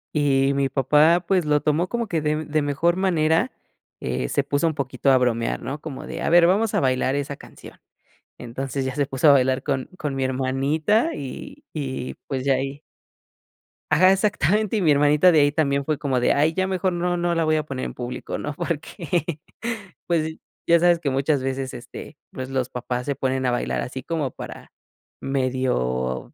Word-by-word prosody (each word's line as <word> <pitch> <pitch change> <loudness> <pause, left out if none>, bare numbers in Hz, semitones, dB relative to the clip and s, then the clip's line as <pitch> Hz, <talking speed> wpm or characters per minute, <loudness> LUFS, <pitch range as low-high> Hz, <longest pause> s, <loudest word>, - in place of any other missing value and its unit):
Y 140 -2 +3
mi 140 -1 +1
papá, 150 +6 +3
pues, 190 -2 +2
lo 150 -1 +2
tomó 160 +4 +1
como 235 -1 -1
que 165 -5 -1
de 150 +1 -1
de 155 +1 0
mejor 145 +5 +1
manera, 170 +3 +2 0.5
eh, - - -2
se 140 - +1
puso 145 +3 0
un 155 - -1
poquito 135 0 0
a 130 - +6
bromear, 120 -2 0
¿no? 140 +4 -5
Como 145 -5 -7
de: 165 +1 -6
"A - - 0
ver, 170 +1 +6
vamos 200 +5 +2
a - - +3
bailar 130 0 +1
esa 145 0 -3
canción". - - -14 0.6
Entonces, 130 +3 -4
ya 130 0 -3
se 145 -2 +1
puso 135 +2 +2
a - - +9
bailar 130 -1 +3
con 130 -1 -2
con 145 -5 -3
mi 135 - 0
hermanita 140 - +1
y 280 - -8
y, 130 -4 -4
pues, 130 -2 -3
ya 140 -1 +3
ahí 135 +2 -3 1.1
Ajá, 185 +4 +6
exactamente. 210 +1 +1
Y 205 - 0
mi 160 - +4
hermanita 150 +5 +5
de 155 - +5
ahí, 145 0 +4
también 140 -2 0
fue 155 0 0
como 135 -3 0
de: 120 - +3
"Ay, 155 +3 +2
ya 185 +2 0
mejor 185 -1 0
no 175 0 0
no 175 0 0
la 165 - +1
voy 155 0 +2
a 155 - 0
poner 135 -3 -5
en - - -5
público, 125 0 -5
¿no?". 145 - -4
Porque, 165 +1 -3 0.7
pues, 160 -2 0 0.3
ya 170 0 +5
sabes 175 0 +4
que 150 -4 -1
muchas 135 +1 +1
veces, 135 0 -3
este, 130 +4 -10
pues, 130 0 -6
los 130 -2 -1
papás 125 0 -4
se 140 -1 -1
ponen 130 0 -1
a 125 - +2
bailar, 120 - -1
así 130 +1 -5
como 155 -5 -2
para - - -10 0.5
medio, 125 - -1
145 Hz, 195 wpm, -23 LUFS, 130-165 Hz, 1.1 s, a